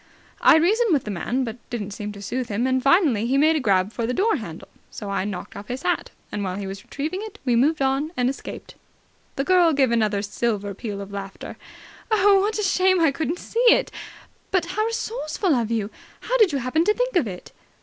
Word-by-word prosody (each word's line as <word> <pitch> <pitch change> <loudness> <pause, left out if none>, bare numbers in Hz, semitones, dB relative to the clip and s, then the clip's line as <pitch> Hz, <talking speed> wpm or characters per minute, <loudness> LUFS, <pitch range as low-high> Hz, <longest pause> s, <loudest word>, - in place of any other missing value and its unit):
"I - - +7
reasoned 405 +6 +3
with 280 - +2
the 210 - -5
man, 240 +8 -1
but 230 -1 -5
didn't 210 -4 -4
seem 210 0 -5
to 200 0 -10
soothe 245 +4 -3
him, 215 +4 -1
and 260 0 +1
finally 275 - +3
he 265 +3 +2
made 310 +3 +4
a - - +1
grab 195 -4 +1
for 230 -2 -2
the 250 - -1
door 440 +3 +2
handle, 170 - -8 0.2
so 205 -2 -7
I 195 -1 -1
knocked 195 -3 -6
off 200 - -8
his 255 +3 -5
hat, 355 - 0 0.2
and 205 - -3
while 185 -1 -3
he 200 0 -5
was 195 0 -7
retrieving 310 +6 -4
it 430 -1 -8
we 245 -2 +2
moved 280 +5 +2
on 270 +4 0
and 250 -1 +2
escaped." 265 - -6 0.6
The 275 - -1
girl 350 0 +4
gave 270 -4 +3
another 215 -3 +1
silver 205 -1 -2
peal 200 -1 -6
of 200 0 -8
laughter. 195 -1 -7 0.5
"Oh, 410 -2 +5
what 420 +3 0
a 425 - -1
shame 370 -1 +3
I 325 -3 +4
couldn't 320 +4 -2
see 460 - -5
it. - - +3 0.6
But 365 -3 +1
how 430 +2 +1
resourceful 445 -6 -1
of 235 -4 0
you! 220 -2 -1 0.3
How - - -2
did 420 -6 +5
you 280 - 0
happen 265 +6 +1
to 425 - +3
think - - -1
of 320 -10 +3
it?" 180 -3 -8
260 Hz, 225 wpm, -23 LUFS, -, 0.6 s, I